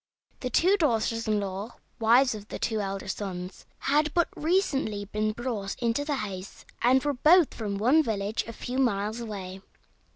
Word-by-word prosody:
The 255 - -3
two 370 +10 +4
daughters 230 - +1
in 215 -1 +2
law, 200 +3 -5 0.2
wives 240 +3 +5
of 210 -1 -8
the - - -6
two 220 -2 -1
elder 195 0 -4
sons, 190 -2 -5
had 300 +2 +2
but 345 -1 +3
recently 280 - 0
been 215 +1 -1
brought 220 -4 -4
into 235 +3 0
the 290 -1 -1
house, 190 -1 -8 0.2
and 255 +2 +4
were 290 0 +1
both 315 +5 +5
from 205 -3 -3
one 255 +10 +4
village 215 -5 -1
a 230 - -6
few 250 +4 -4
miles 215 -3 0
away. 195 -4 -6
225 Hz, 170 wpm, -27 LUFS, 205-270 Hz, 0.2 s, wives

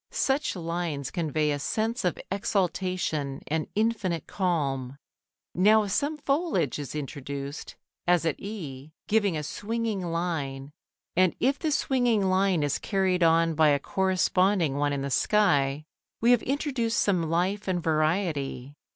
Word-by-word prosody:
Such 275 -1 0
lines 165 -4 -3
convey 155 -3 0
a 145 - -1
sense 225 - -1
of 180 - 0
exaltation 180 -7 -1
and 155 0 -2
infinite 210 -6 0
calm. 140 -8 -1 0.6
Now 215 +4 +5
if 200 - -4
some 295 +8 0
foliage 275 - 0
is 145 -1 -6
introduced, 140 0 -6 0.3
as 175 -2 +3
at 160 - -1
E, 155 -9 -7
giving 205 -6 +2
a 150 - -3
swinging 225 +4 -3
line, 150 -5 -3 0.4
and 185 0 +3
if 270 +3 +1
this 310 -2 +1
swinging 245 -6 +1
line 190 -3 +2
is 145 - 0
carried 190 -3 0
on 165 0 +4
by 155 0 +4
a 145 - +4
corresponding 185 -1 +1
one 145 0 +1
in 140 -1 -2
the 140 - -3
sky, 145 -6 +2 0.4
we 235 +2 +4
have 245 -2 +5
introduced 260 -5 -1
some 175 -6 +1
life 185 +5 0
and 180 -3 -1
variety. 155 -4 0
175 Hz, 140 wpm, -27 LUFS, 150-205 Hz, 0.6 s, Now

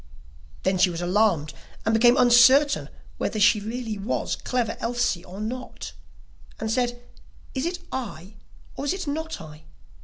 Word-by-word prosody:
Then 190 -1 +1
she 185 - +5
was 170 -1 -4
alarmed, 175 -5 +1 0.3
and 225 - +2
became 240 +2 +5
uncertain 255 +4 +5 0.3
whether 215 - -2
she 210 +1 +5
really 220 0 -5
was 205 +5 -2
Clever 245 -3 -2
Elsie 235 -7 -1
or 185 +2 -10
not, 250 +4 -6 0.7
and 220 0 -2
said: 245 0 0 0.5
'Is 265 +4 -1
it 350 +1 -3
I, 205 -7 -6 0.4
or 275 - -5
is 290 - +1
it 375 -2 -5
not 320 +2 -4
I? 155 -1 -11
230 Hz, 150 wpm, -25 LUFS, 195-255 Hz, 0.7 s, she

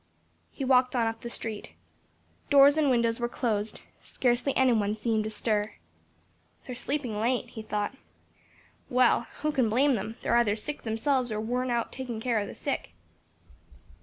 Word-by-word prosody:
He 275 - -4
walked 255 0 +3
on 235 -2 +2
up 225 0 -3
the 235 - -6
street. 220 -3 -5 0.8
Doors 280 0 +7
and 305 -3 +3
windows 235 -2 +2
were 240 0 -1
closed; 220 -4 -2 0.2
scarcely 250 +2 0
any 260 -2 +4
one 210 -1 +1
seemed 220 0 0
astir. 215 0 -1 0.9
"They're 255 - -6
sleeping 245 -4 -2
late," 245 +2 0
he 220 - -8
thought 210 +1 -2 1.0
"Well 250 -1 +3 0.2
who 305 - +2
can 255 -6 +1
blame 265 +6 +3
them? 220 0 -3
they're 235 - +3
either 220 -4 +3
sick 290 +7 -5
themselves 245 +2 0
or 215 - -2
worn 250 +3 -1
out 235 -1 -1
taking 250 -4 -5
care 230 -1 0
of 205 - -3
the - - -9
sick." - - -3
235 Hz, 165 wpm, -28 LUFS, 220-255 Hz, 1.0 s, Doors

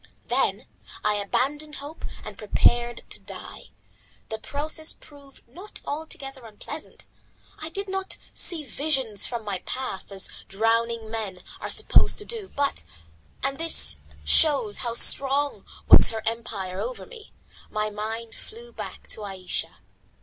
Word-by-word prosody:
Then - - +1 0.4
I 210 - +4
abandoned 295 +9 -1
hope 290 +4 -7 0.2
and 210 - -6
prepared 240 +3 +3
to - - -6
die. - - -9 0.6
The 220 - -3
process 310 +5 -2
proved 280 -4 -16
not 360 - -10
altogether 280 -3 -5
unpleasant. 210 -2 -8 0.5
I 315 - -3
did 395 +4 -3
not 385 0 -2 0.2
see 330 -4 +1
visions 265 -6 +1
from 235 -3 -4
my 195 -3 -2
past 255 -6 -4
life 200 - -7
as - - -2 0.2
drowning 225 +2 +1
men 200 -5 -4 0.2
are - - -3
supposed - - +5
to 420 - -2
do, 440 -4 -4
but 280 0 +1 0.6
and 275 +2 0
this 325 - +3 0.3
shows 240 - +6
how 235 -2 -2
strong 275 +3 +3 0.2
was - - +10
her 220 -1 -3
empire 205 -5 -3
over 240 +5 -4
me 460 -4 -13 0.4
my 215 0 -1
mind 220 +2 -4
flew 475 +2 -11
back - - -7
to 215 - +2
Ayesha. 190 -2 -4
240 Hz, 140 wpm, -26 LUFS, 215-300 Hz, 0.6 s, was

